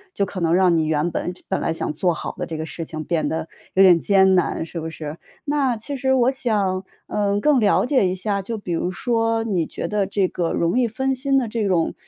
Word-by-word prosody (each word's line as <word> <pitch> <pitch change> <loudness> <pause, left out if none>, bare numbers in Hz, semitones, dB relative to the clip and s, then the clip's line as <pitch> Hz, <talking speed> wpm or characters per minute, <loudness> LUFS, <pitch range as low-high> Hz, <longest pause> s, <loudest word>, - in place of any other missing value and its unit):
就 200 - +1
可 190 - -6
能 165 +1 +3
让 180 -2 +4
你 160 -1 +2
原 155 +2 0
本 175 - -2
就 180 - -15
本 190 - -1
来 - - 0
想 160 - -3
做 175 +3 +1
好 160 - -4
的 - - -3
这 160 - -5
个 160 - -4
事 165 0 -6
情 155 0 -6
变 165 -1 -1
得 160 0 -3 0.3
有 195 - +6
点 175 -3 +7
艰 190 -1 +4
难， 175 -2 +1
是 170 - -6
不 160 0 -4
是？ 155 0 -7 0.3
那 280 -5 0
其 280 +6 -6
实 265 0 +1
我 255 +1 +3
想， 205 -8 -1 0.2
嗯， 205 -1 0
更 290 +1 +3
了 210 +2 +3
解 250 -8 +3
一 185 - -1
下， 200 +1 -2
就 225 +3 -5
比 180 -4 -5
如 175 - -1
说， 225 +3 0
你 185 -7 -1
觉 - - -5
得 205 -2 0
这 195 -2 +1
个 175 -2 -2
容 170 +9 +1
易 240 - +3
分 265 +4 -1
心 270 +1 +1
的 245 -4 +1
这 215 -2 -1
种， 175 -3 +1
195 Hz, 270 characters per minute, -22 LUFS, 170-230 Hz, 0.3 s, 点